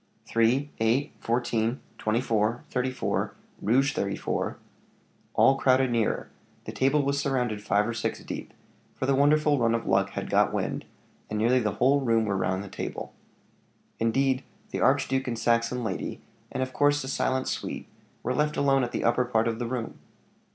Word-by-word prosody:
"Three 125 +6 +2
eight 115 +6 +1
fourteen 115 0 0 0.2
twenty 110 +3 +1
four 115 -1 0
thirty 125 +1 0
four, 130 - -2 0.3
Rouge 135 +7 +3
34 100 0 -2 0.4
" - - -37
All 135 - +5
crowded 130 -1 +3
nearer; 115 -2 0 0.3
the - - -5
table 135 +2 +2
was 140 +1 0
surrounded 125 -7 -1
five 105 0 +2
or 120 - -2
six 110 - -2
deep, - - -6 0.4
for - - -2
the 135 - +3
wonderful 145 +1 +4
run 115 -1 +3
of 115 - -3
luck - - +2
had - - -4
got - - +4
wind, - - -2 0.4
and 105 - -2
nearly 120 +4 +3
the 105 -3 -1
whole 135 +3 +3
room 115 -3 +2
were 100 -2 0
round 95 0 0
the - - -8
table. - - -6 0.9
Indeed, 130 +4 +1 0.3
the - - -2
archduke 130 0 +2
and 120 -2 -2
Saxon 115 +1 +1
lady, 105 -5 -3 0.3
and 130 - -1
of 130 0 -6
course 145 0 +3
the - - -6
silent 130 -1 0
suite, - - -4 0.4
were 125 - 0
left 150 +3 0
alone 135 -2 +3
at 120 - -3
the - - -1
upper 125 +2 +3
part 115 -2 +1
of 115 0 -2
the 120 - -2
room. 120 -2 -4
125 Hz, 180 wpm, -27 LUFS, 115-135 Hz, 0.9 s, All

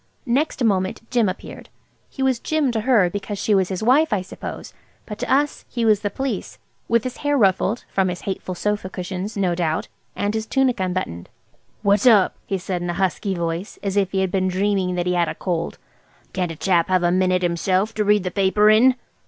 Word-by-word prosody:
Next 270 +2 0
moment 195 +1 0
Jim 235 -5 +3
appeared. 185 - -8 0.4
He 270 - -4
was 260 -3 +2
Jim 305 -2 0
to 225 -2 -1
her 225 -6 +4
because 205 +3 -4
she 210 - +1
was 190 -2 +2
his 190 +2 -3
wife, 275 +7 +4
I 200 -4 0
suppose, 185 - -8 0.3
but 210 -1 -8
to - - -3
us 285 +2 +1
he 235 -2 -1
was 215 -2 +4
the 205 - -2
Police, 245 -2 -4 0.3
with 235 -1 +2
his 255 - -5
hair 290 0 0
ruffled–from 195 -1 +1
his 180 -1 -4
hateful 190 -1 -4
sofa 210 0 -2
cushions, 190 +3 -5
no 185 -3 +1
doubt–and 175 +4 -3
his 220 0 -3
tunic 265 -3 +1
unbuttoned. 180 - -3 0.5
"What's 200 +3 +3
up?" 210 -6 +5
he 195 - -1
said 180 -1 -4
in 175 - -3
a 175 - -2
husky 190 +1 -1
voice, 170 +3 -3
as 200 -1 -2
if 195 -2 +1
he 190 - 0
had 190 -1 0
been 185 -1 +1
dreaming 185 -1 0
that 175 0 -1
he 180 - +1
had 175 -1 +1
a - - -5
cold. 170 -3 -3 0.6
"Can't 180 -3 -1
a - - -7
chap 170 0 +2
have 185 -1 +2
a 175 - +3
minute 185 0 +2
himself 185 +4 0
to 215 - 0
read 210 -1 +3
the 180 - -3
paper 205 +2 +4
in?" 250 +4 +5
195 Hz, 210 wpm, -22 LUFS, 185-220 Hz, 0.6 s, up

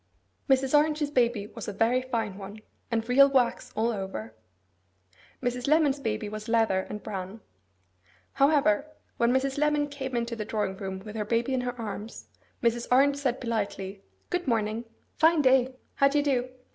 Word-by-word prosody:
Mrs. 265 +1 +3
Orange's 300 0 +2
baby 240 -6 +1
was 225 +1 -9
a - - -2
very 235 +5 +2
fine 225 -6 -3
one, 200 +2 -9 0.3
and 225 -1 -1
real 275 +3 +6
wax 260 -3 +1
all 225 +2 +1
over. 190 - -5 1.1
Mrs. 245 +1 -2
Lemon's 295 -2 +3
baby 215 -4 -2
was 215 +1 -7
leather 225 -4 +3
and 210 - -6
bran. 195 +1 -6 0.9
However, 280 -3 +3 0.3
when 235 0 +3
Mrs. 265 +2 0
Lemon 300 -1 +2
came 265 -3 -5
into 235 0 -1
the 220 - -4
drawing 210 -3 -2
room 190 -1 -5
with 215 0 -8
her 215 - -1
baby 230 +4 0
in 255 - +1
her 245 0 -4
arms, 215 0 -7 0.3
Mrs. 235 0 +1
Orange 280 +2 +5
said 265 -3 -1
politely, 200 -4 -3 0.3
'Good 360 -3 -1
morning. 225 -1 0 0.3
Fine 320 -1 +5
day. 260 0 +4 0.2
How 275 - +5
do 280 +2 +1
you 290 - +3
do? 255 -3 0
240 Hz, 170 wpm, -27 LUFS, 215-275 Hz, 1.1 s, real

